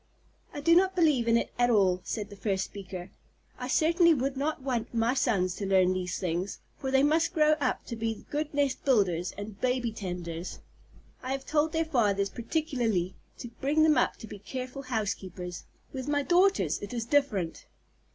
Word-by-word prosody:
"I 290 Hz, -, -6 dB
do 335 Hz, +3 st, +5 dB
not 380 Hz, +1 st, +4 dB
believe 300 Hz, -9 st, +3 dB
in 230 Hz, 0 st, +5 dB
it -, -, -2 dB
at 245 Hz, 0 st, +4 dB
all," 190 Hz, -5 st, +3 dB
said 210 Hz, +1 st, -4 dB
the -, -, -8 dB
first 195 Hz, -2 st, -1 dB
speaker. 190 Hz, -2 st, -8 dB, 0.5 s
"I 250 Hz, -, -4 dB
certainly 330 Hz, +4 st, +4 dB
would 270 Hz, +1 st, -1 dB
not 280 Hz, 0 st, -2 dB
want 245 Hz, -3 st, -2 dB
my 230 Hz, +2 st, +2 dB
sons 195 Hz, -9 st, +1 dB
to 200 Hz, -, -3 dB
learn 185 Hz, -1 st, +4 dB
these 180 Hz, -1 st, -3 dB
things, 180 Hz, +2 st, -2 dB, 0.2 s
for 265 Hz, -, -4 dB
they 265 Hz, +1 st, +4 dB
must 325 Hz, +4 st, +2 dB
grow 305 Hz, -1 st, +5 dB
up 255 Hz, -2 st, -1 dB
to 235 Hz, -, -5 dB
be 225 Hz, -1 st, -3 dB
good 300 Hz, +1 st, -2 dB
nest 285 Hz, -2 st, 0 dB
builders 185 Hz, -9 st, +2 dB
and 205 Hz, 0 st, -8 dB
baby 250 Hz, -2 st, 0 dB
tenders. 180 Hz, -4 st, -5 dB, 0.6 s
I 255 Hz, -, -4 dB
have 270 Hz, 0 st, -4 dB
told 310 Hz, +1 st, +1 dB
their 325 Hz, 0 st, 0 dB
fathers 205 Hz, -9 st, +1 dB
particularly 235 Hz, -, -1 dB, 0.2 s
to 240 Hz, -, -7 dB
bring 295 Hz, +3 st, +3 dB
them 310 Hz, -1 st, +5 dB
up 250 Hz, -, +2 dB
to 220 Hz, -, -10 dB
be 205 Hz, -, -9 dB
careful 255 Hz, +6 st, -6 dB
housekeepers. 195 Hz, -7 st, -4 dB, 0.3 s
With 260 Hz, 0 st, -5 dB
my 290 Hz, -1 st, +1 dB
daughters, 350 Hz, -, +3 dB
it 205 Hz, +4 st, -6 dB
is 230 Hz, -1 st, -2 dB
different." 230 Hz, -, 0 dB
240 Hz, 185 wpm, -29 LUFS, 195-285 Hz, 0.6 s, do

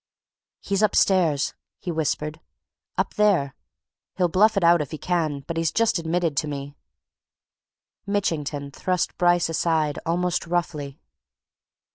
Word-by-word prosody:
"He's 200 Hz, 0 st, -1 dB
upstairs!" 185 Hz, -8 st, +3 dB, 0.2 s
he 180 Hz, -, -5 dB
whispered. 155 Hz, -1 st, -2 dB, 0.6 s
"Up -, -, 0 dB
there! 190 Hz, -10 st, +2 dB, 0.6 s
He'll 180 Hz, -2 st, +2 dB
bluff 210 Hz, +5 st, +4 dB
it 195 Hz, -, +2 dB
out 170 Hz, -1 st, +5 dB
if 145 Hz, -, -4 dB
he 155 Hz, -, -6 dB
can, 160 Hz, -4 st, -1 dB
but 165 Hz, +4 st, -6 dB
he's 165 Hz, 0 st, +1 dB
just 225 Hz, -4 st, +2 dB
admitted 165 Hz, -1 st, -1 dB
to 150 Hz, -, +1 dB
me 140 Hz, 0 st, -6 dB, 0.7 s
" -, -, -69 dB, 0.5 s
Mitchington 150 Hz, -8 st, -2 dB
thrust 180 Hz, +4 st, -1 dB
Bryce 175 Hz, 0 st, +3 dB
aside, 160 Hz, -2 st, 0 dB
almost 175 Hz, +1 st, -1 dB
roughly. 155 Hz, -5 st, -2 dB
165 Hz, 130 wpm, -24 LUFS, 150-180 Hz, 0.7 s, out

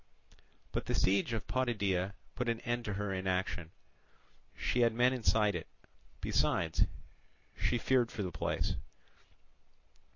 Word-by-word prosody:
But -, -, -2 dB
the -, -, 0 dB
siege 100 Hz, +4 st, +3 dB
of 115 Hz, -3 st, -2 dB
Potidæa 100 Hz, -7 st, 0 dB, 0.2 s
put 125 Hz, -1 st, -1 dB
an 115 Hz, -1 st, 0 dB
end 120 Hz, -1 st, -1 dB
to 105 Hz, -, -2 dB
her 100 Hz, 0 st, -2 dB
inaction; 95 Hz, -3 st, -1 dB, 0.9 s
she 125 Hz, -, 0 dB
had 115 Hz, -2 st, +4 dB
men 125 Hz, +2 st, +4 dB
inside 110 Hz, -4 st, +3 dB
it: 85 Hz, -3 st, -4 dB, 0.5 s
besides, 80 Hz, -1 st, +2 dB, 0.7 s
she 120 Hz, -, +1 dB
feared 125 Hz, 0 st, +3 dB
for 105 Hz, -, -3 dB
the 90 Hz, -, -3 dB
place. 80 Hz, -, -1 dB
105 Hz, 130 wpm, -34 LUFS, 95-120 Hz, 0.9 s, had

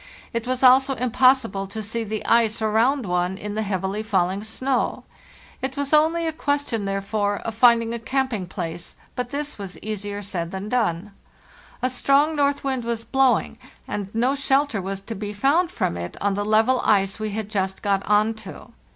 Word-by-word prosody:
It 230 Hz, +1 st, -2 dB
was 255 Hz, 0 st, -1 dB
also 265 Hz, +1 st, +6 dB
impossible 250 Hz, -5 st, +2 dB
to 215 Hz, +3 st, -6 dB
see 225 Hz, +2 st, -3 dB
the 215 Hz, 0 st, -4 dB
ice 230 Hz, -1 st, +3 dB
around 225 Hz, +5 st, +2 dB
one 180 Hz, +1 st, -1 dB
in 210 Hz, 0 st, -5 dB
the 215 Hz, -, -1 dB
heavily 195 Hz, 0 st, -2 dB
falling 195 Hz, -2 st, 0 dB
snow. 255 Hz, +4 st, -1 dB, 0.6 s
It 265 Hz, +1 st, -3 dB
was 285 Hz, +1 st, -2 dB
only 320 Hz, +2 st, +4 dB
a 320 Hz, -, -1 dB
question, 285 Hz, -8 st, -1 dB
therefore, 200 Hz, +1 st, -1 dB
of 225 Hz, -, -4 dB
finding 230 Hz, 0 st, +4 dB
a 235 Hz, -, -3 dB
camping 255 Hz, -5 st, -1 dB
place, 175 Hz, -2 st, -6 dB, 0.2 s
but 250 Hz, -1 st, -3 dB
this 285 Hz, -2 st, -4 dB
was 190 Hz, -4 st, -6 dB
easier 205 Hz, 0 st, -5 dB
said 175 Hz, -4 st, -3 dB
than 190 Hz, +3 st, -5 dB
done. 210 Hz, -5 st, 0 dB, 0.7 s
A 255 Hz, -, +2 dB
strong 280 Hz, +5 st, +3 dB
north 285 Hz, -1 st, +1 dB
wind 265 Hz, -3 st, -1 dB
was 230 Hz, -1 st, -3 dB
blowing, 265 Hz, -2 st, +2 dB, 0.3 s
and 200 Hz, -2 st, -4 dB
no 245 Hz, +4 st, +2 dB
shelter 275 Hz, -4 st, +1 dB
was 195 Hz, +1 st, -4 dB
to 215 Hz, +3 st, -6 dB
be 210 Hz, 0 st, -5 dB
found 290 Hz, -, +2 dB
from 350 Hz, -, -1 dB
it 85 Hz, 0 st, -6 dB
on 200 Hz, 0 st, +1 dB
the 205 Hz, +1 st, -2 dB
level 220 Hz, +4 st, +3 dB
ice 195 Hz, 0 st, +2 dB
we 215 Hz, 0 st, -2 dB
had 210 Hz, 0 st, -4 dB
just 190 Hz, -3 st, -2 dB
got 195 Hz, -1 st, +1 dB
on 210 Hz, +2 st, +3 dB
to. 195 Hz, -, -11 dB
220 Hz, 185 wpm, -23 LUFS, 200-260 Hz, 0.7 s, also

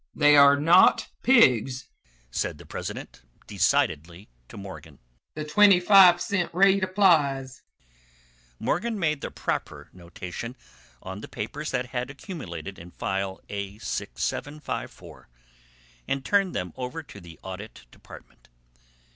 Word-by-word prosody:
"They 150 Hz, -1 st, +5 dB
are 140 Hz, 0 st, +7 dB
not 170 Hz, +5 st, +5 dB
pigs," 135 Hz, -, +3 dB, 0.4 s
said -, -, -2 dB
the -, -, -14 dB
president, -, -, -7 dB, 0.2 s
decidedly, 85 Hz, +6 st, -1 dB, 0.2 s
to -, -, -11 dB
Morgan. 80 Hz, -7 st, -10 dB, 0.4 s
"The 155 Hz, 0 st, -5 dB
twenty 195 Hz, +4 st, +5 dB
five 180 Hz, -1 st, +7 dB
cent 185 Hz, -2 st, -2 dB
rate 195 Hz, +1 st, +4 dB
applies." 145 Hz, -, +2 dB, 1.0 s
Morgan 220 Hz, -, -2 dB
made 155 Hz, -6 st, -1 dB
the -, -, -4 dB
proper -, -, -5 dB
notation 90 Hz, +7 st, -8 dB, 0.5 s
on 95 Hz, +2 st, -7 dB
the -, -, -8 dB
papers 145 Hz, +8 st, -6 dB
that 125 Hz, 0 st, -2 dB
had 125 Hz, 0 st, -3 dB
accumulated 100 Hz, -, -8 dB
in 85 Hz, +1 st, -11 dB
File 95 Hz, +1 st, -4 dB
A6754, 105 Hz, +8 st, -5 dB, 0.8 s
and 135 Hz, -1 st, -2 dB
turned 200 Hz, -2 st, +1 dB
them 90 Hz, -2 st, -4 dB
over 130 Hz, +6 st, -6 dB
to 100 Hz, -8 st, -13 dB
the 85 Hz, -2 st, -14 dB
Audit 95 Hz, -, -9 dB
Department. -, -, -16 dB
135 Hz, 120 wpm, -25 LUFS, -, 1.0 s, are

